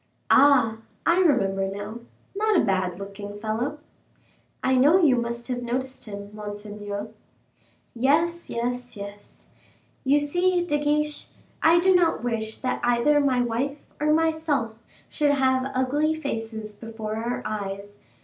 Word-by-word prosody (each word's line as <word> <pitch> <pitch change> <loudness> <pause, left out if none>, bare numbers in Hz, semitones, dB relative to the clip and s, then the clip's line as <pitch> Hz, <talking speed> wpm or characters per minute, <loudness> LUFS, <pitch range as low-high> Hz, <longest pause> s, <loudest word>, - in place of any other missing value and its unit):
"Ah, 260 -5 +5 0.3
I 340 +2 +4
remember 195 - +2
now 205 +4 -6 0.4
not 425 -2 +3
a - - +2
bad 185 -2 0
looking 200 +1 -8
fellow." 230 +7 -2 0.9
"I 260 - +3
know 290 +8 +6
you 300 -8 +5
must 235 0 -3
have 250 -1 -2
noticed 260 +2 -3
him, 200 -1 -8
monseigneur." 205 0 -6 0.8
"Yes, 315 +8 +1
yes, 245 0 -3
yes. 200 0 -10 0.5
You 280 +2 +4
see, 355 +4 +1
De 295 -4 0
Guiche, 300 0 0 0.3
I 330 +2 +6
do 375 +2 +4
not 345 -9 +3
wish 220 -2 -2
that 255 - -1
either 245 +5 +3
my 260 -3 +2
wife 245 +4 -1 0.2
or 300 +1 +2
myself 315 -7 +1 0.3
should 290 -1 +1
have 260 -1 +2
ugly 290 +5 +1
faces 225 -7 -5
before 220 0 -6
our 235 +2 -3
eyes. 200 -1 -5
245 Hz, 135 wpm, -25 LUFS, 215-295 Hz, 0.9 s, know